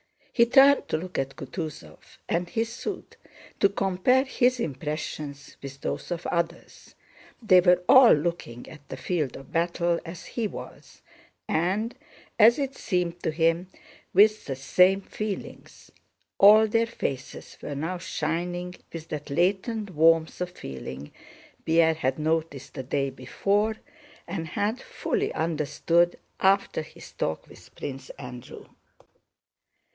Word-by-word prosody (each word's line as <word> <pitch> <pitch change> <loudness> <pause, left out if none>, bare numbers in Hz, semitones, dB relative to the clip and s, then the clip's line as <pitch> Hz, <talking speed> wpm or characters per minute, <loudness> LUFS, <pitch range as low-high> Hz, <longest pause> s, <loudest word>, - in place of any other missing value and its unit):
He 235 -1 +4
turned 275 +3 +6
to - - 0
look 180 +3 -5
at 135 0 -3
Kutúzov 135 - -7 0.3
and 175 +1 -1
his 225 +3 -2
suite, - - -6 0.4
to 200 - +5
compare 195 +7 +2
his 255 -2 +1
impressions 150 - -5
with 140 0 -9
those - - -4
of 175 -1 -4
others. 170 0 -4 0.5
They 185 -4 +6
were 180 0 +4
all 260 -3 +8
looking 150 -6 -3
at 145 -2 -13
the - - -6
field 155 -8 -2
of 135 - -12
battle 170 0 0
as 165 +1 -9
he 230 -3 -2
was, - - -11 0.4
and, 195 +8 0 0.5
as 230 +3 +7
it 275 -2 -2
seemed 175 -2 -2
to - - -1
him, 165 +3 +1 0.5
with 215 +1 +5
the 135 - -3
same 180 +8 +3
feelings. 210 0 -7 0.5
All 215 +2 +8
their 230 +1 +1
faces 135 - -6
were 145 - -5
now 165 +6 -3
shining 175 +1 -3 0.2
with 165 -1 -8
that 150 -1 -5
latent 195 - 0
warmth 165 +1 +3
of 180 - -1
feeling 70 - -8 0.5
Pierre 165 0 +4
had 135 -4 -1
noticed 155 -3 -2
the 135 - -5
day 135 +1 -1
before 200 - 0 0.5
and 170 -2 -4
had 210 +8 -2
fully 470 -4 -2
understood 165 +2 +1 0.2
after 195 -4 +2
his 155 - -13
talk 80 - -3
with - - -17
Prince 135 -1 -7
Andrew. 125 -2 -10
170 Hz, 135 wpm, -26 LUFS, 150-200 Hz, 0.5 s, all